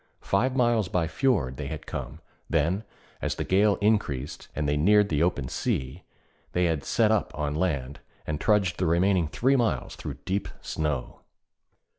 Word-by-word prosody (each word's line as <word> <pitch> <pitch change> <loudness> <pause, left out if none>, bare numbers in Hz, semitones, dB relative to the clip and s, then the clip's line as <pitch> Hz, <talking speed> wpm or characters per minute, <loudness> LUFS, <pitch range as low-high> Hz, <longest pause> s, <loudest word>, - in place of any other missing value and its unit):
Five 125 +7 +1
miles 120 -5 +2
by 90 -3 +1
fjord 80 - +1
they 70 -1 -4
had 80 0 -6
come; 75 +5 -6 0.3
then, 85 +6 +1 0.4
as - - -1
the - - -2
gale 100 +2 +3
increased, 90 -11 0
and 75 -1 -1
they 75 - +1
neared 100 +7 +4
the 75 -1 +1
open 80 -6 +1
sea, 65 +1 -2 0.5
they 90 0 +2
had 80 -4 0
'set 110 -2 +2
up' 110 -3 +1
on 75 -1 -1
land, 70 -5 -1 0.3
and 75 -1 -3
trudged 100 -4 +2
the 90 - +1
remaining 90 +1 +3
three 130 - +2
miles 110 - 0
through - - -6
deep 100 +2 -1
snow. 75 -5 -3
85 Hz, 165 wpm, -27 LUFS, 75-105 Hz, 0.5 s, neared